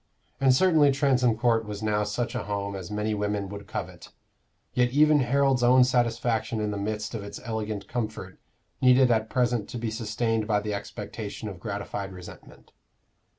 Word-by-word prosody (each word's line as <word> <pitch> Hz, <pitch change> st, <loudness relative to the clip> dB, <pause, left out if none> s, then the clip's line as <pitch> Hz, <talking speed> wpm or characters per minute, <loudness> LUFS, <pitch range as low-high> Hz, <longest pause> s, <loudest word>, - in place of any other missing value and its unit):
And 135 Hz, -1 st, +5 dB
certainly 150 Hz, 0 st, +5 dB
Transome 130 Hz, -4 st, +2 dB
Court 115 Hz, -1 st, +2 dB
was 105 Hz, 0 st, -7 dB
now 105 Hz, -1 st, +1 dB
such 105 Hz, +4 st, -2 dB
a -, -, -3 dB
home 100 Hz, -1 st, -3 dB
as 95 Hz, -1 st, -7 dB
many 105 Hz, +1 st, -1 dB
women 105 Hz, -1 st, -2 dB
would 100 Hz, 0 st, -8 dB
covet. -, -, -6 dB, 0.6 s
Yet 125 Hz, 0 st, +3 dB
even 150 Hz, +3 st, +4 dB
Harold's 135 Hz, 0 st, +2 dB
own 125 Hz, +1 st, +6 dB
satisfaction 120 Hz, -2 st, 0 dB
in 105 Hz, -1 st, -1 dB
the 100 Hz, -, -3 dB
midst 105 Hz, +2 st, -3 dB
of 110 Hz, -3 st, -4 dB
its 100 Hz, -, -8 dB
elegant 110 Hz, -2 st, -4 dB
comfort 110 Hz, -6 st, -5 dB, 0.4 s
needed 125 Hz, 0 st, +5 dB
at 110 Hz, -1 st, +1 dB
present 120 Hz, -4 st, 0 dB
to -, -, -5 dB
be 115 Hz, -1 st, -3 dB
sustained 110 Hz, 0 st, -1 dB
by 105 Hz, -2 st, +2 dB
the 105 Hz, 0 st, -3 dB
expectation 100 Hz, +2 st, -6 dB
of 95 Hz, -3 st, -9 dB
gratified 100 Hz, 0 st, -5 dB
resentment. 90 Hz, -1 st, -13 dB
110 Hz, 170 wpm, -26 LUFS, 105-125 Hz, 0.6 s, own